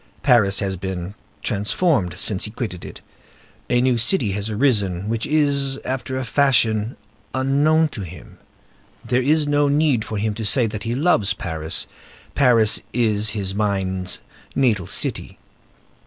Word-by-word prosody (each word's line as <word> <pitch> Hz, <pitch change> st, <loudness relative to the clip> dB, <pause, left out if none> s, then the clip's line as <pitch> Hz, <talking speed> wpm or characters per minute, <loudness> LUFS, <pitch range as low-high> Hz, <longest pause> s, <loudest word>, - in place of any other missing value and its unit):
Paris 110 Hz, -7 st, +4 dB
has 95 Hz, -1 st, -1 dB
been 95 Hz, 0 st, -5 dB, 0.3 s
transformed 105 Hz, -, 0 dB
since 100 Hz, -3 st, 0 dB
he -, -, -6 dB
quitted 105 Hz, -6 st, -5 dB
it. -, -, -10 dB, 0.7 s
A 120 Hz, 0 st, +3 dB
new 125 Hz, -2 st, +2 dB
city 115 Hz, -, +1 dB
has 100 Hz, +2 st, -4 dB
arisen, 105 Hz, -6 st, 0 dB
which 115 Hz, 0 st, -2 dB
is, 140 Hz, -3 st, +2 dB
after 130 Hz, 0 st, -3 dB
a 130 Hz, -, -2 dB
fashion, 120 Hz, -4 st, +2 dB, 0.4 s
unknown 145 Hz, +5 st, +3 dB
to 105 Hz, -, -7 dB
him. 90 Hz, -4 st, -11 dB, 0.7 s
There 125 Hz, +1 st, +1 dB
is 150 Hz, +3 st, +2 dB
no 145 Hz, 0 st, +2 dB
need 145 Hz, -5 st, +2 dB
for 110 Hz, 0 st, -5 dB
him 105 Hz, +1 st, -1 dB
to 110 Hz, +1 st, -6 dB
say 115 Hz, +4 st, +3 dB
that 105 Hz, 0 st, -5 dB
he 115 Hz, +1 st, -1 dB
loves 135 Hz, -, +2 dB
Paris: 80 Hz, -1 st, -2 dB, 0.5 s
Paris 115 Hz, -6 st, +4 dB
is 110 Hz, -3 st, +2 dB
his 95 Hz, -1 st, -2 dB
mind's 95 Hz, -3 st, -1 dB, 0.3 s
natal 110 Hz, -10 st, +1 dB
city. -, -, -2 dB
115 Hz, 145 wpm, -21 LUFS, 100-135 Hz, 0.7 s, Paris